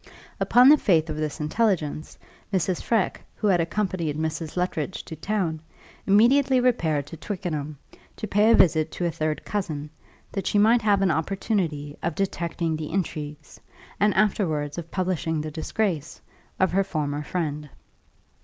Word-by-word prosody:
Upon 250 +2 +6
the 300 0 +7
faith 160 -4 +2
of 150 - -4
this 155 -1 -3
intelligence, 155 -2 -1 0.3
Mrs. 185 -2 0
Freke, 225 -5 0
who - - -4
had 185 -4 +4
accompanied 170 -4 -2
Mrs. 160 +1 -3
Luttridge 180 -1 -2
to 160 - -7
town, 170 -1 -2 0.5
immediately 255 +6 +5
repaired 165 - +1
to 160 - -10
Twickenham, 155 -7 -4 0.4
to - - -5
pay 210 +2 +3
a 230 - +7
visit 160 -2 +4
to 175 - -2
a 170 - +1
third 155 -1 -2
cousin, 155 -8 -3 0.4
that 195 - -3
she - - +1
might 225 +3 +5
have 205 -2 +3
an 190 - +3
opportunity 160 -4 -1
of 170 -2 -2
detecting 170 -3 -2
the 155 -1 -5
intrigues, 155 -5 -4 0.4
and 210 +1 +4
afterwards 170 -7 +1
of 165 -1 -8
publishing 175 -4 -1
the 155 +1 -4
disgrace, 165 0 -2 0.4
of 190 - +3
her 195 +2 +2
former 150 -5 -2
friend. 150 -3 -3
170 Hz, 155 wpm, -25 LUFS, 155-200 Hz, 0.5 s, the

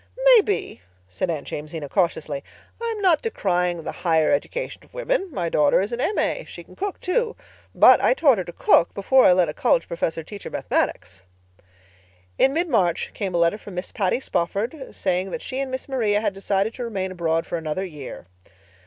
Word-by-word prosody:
"Maybe," 410 - +1 0.3
said 95 - -3
Aunt 155 -4 -3
Jamesina 150 0 -5
cautiously. 155 -4 -1 0.4
"I 465 0 -1
am 415 - -6
not 345 -5 +4
decrying 180 - -1
the - - -4
higher 160 -3 +3
education - - -2
of - - -22
women. - - -1
My 180 - -2
daughter 150 -3 +3
is 200 +4 -2
an 240 +1 -3
M.A. 425 - 0
She - - -10
can - - -17
cook, 400 -1 -4
too. 455 +5 0 0.4
But - - +7
I - - +4
taught 275 - +4
her - - -1
to - - -7
cook 170 - +3
before 260 +7 +4
I 180 - +7
let 180 -1 +3
a 150 - -4
college 165 - +1
professor 165 -1 -2
teach 200 +4 -10
her - - -7
Mathematics." 95 - -2 1.2
In 270 - +5
mid 335 +5 0
March 190 - +1
came 190 -3 -3
a - - +3
letter 170 +5 +2
from 200 -3 -10
Miss 180 +1 -5
Patty 200 +1 0
Spofford, 225 - -2
saying 185 0 -1
that 240 - -5
she 260 - -4
and 275 -1 -2
Miss 260 0 -5
Maria 225 -7 +1
had 210 -2 -1
decided 195 +2 -1
to 250 - -6
remain 195 -5 -3
abroad 165 -2 -1
for 170 - -3
another 160 +4 -3
year. 150 - -9
195 Hz, 195 wpm, -23 LUFS, 170-265 Hz, 1.2 s, But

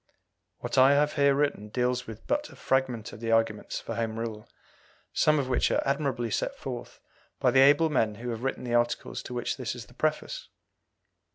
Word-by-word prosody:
What - - -1
I 135 +2 +7
have 145 +1 +2
here 140 -1 +4
written 140 -7 0
deals 125 +2 -1
with 110 -1 -9
but 295 +1 -1
a - - -14
fragment 130 -4 -1
of - - -9
the 115 0 -2
arguments 115 -2 +1
for - - -6
Home 115 -1 -2
Rule, 110 -2 -5 0.6
some 155 0 +3
of 140 -3 0
which 130 - +2
are - - +1
admirably 135 -5 -1
set - - -1
forth - - -7 0.4
by - - +3
the 135 - +4
able 145 +4 +5
men 110 -7 +1
who 120 +3 -6
have 115 0 -5
written 135 0 -2
the 120 -1 -3
articles 120 0 0
to 125 - -7
which 120 - -2
this 125 -2 -3
is 120 -3 -8
the 120 - -19
preface. 155 - -2
125 Hz, 200 wpm, -28 LUFS, 115-140 Hz, 0.6 s, I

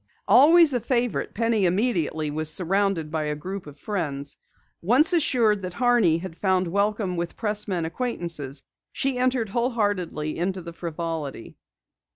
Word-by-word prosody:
Always 320 +2 +7
a 245 - +1
favorite, 245 0 -1
Penny 225 -3 +1
immediately 170 -6 0
was 155 +1 0
surrounded 185 -2 0
by 155 -1 -2
a 150 0 -2
group 185 +4 -7
of 145 0 -12
friends. 145 -8 -4 0.5
Assured 255 - +4
that 185 -1 -6
Horney 235 -9 +3
had 170 -1 -7
found 185 -1 +1
welcome 200 0 -1
with 170 0 -4
pressmen 210 -6 -1
acquaintances, 165 - -3 0.3
she 265 -2 -1
entered 250 -3 +1
wholeheartedly 205 -10 -1
into 185 +1 -2
the 170 0 -8
frivolity. 165 -6 -5
190 Hz, 135 wpm, -24 LUFS, 165-230 Hz, 0.5 s, Always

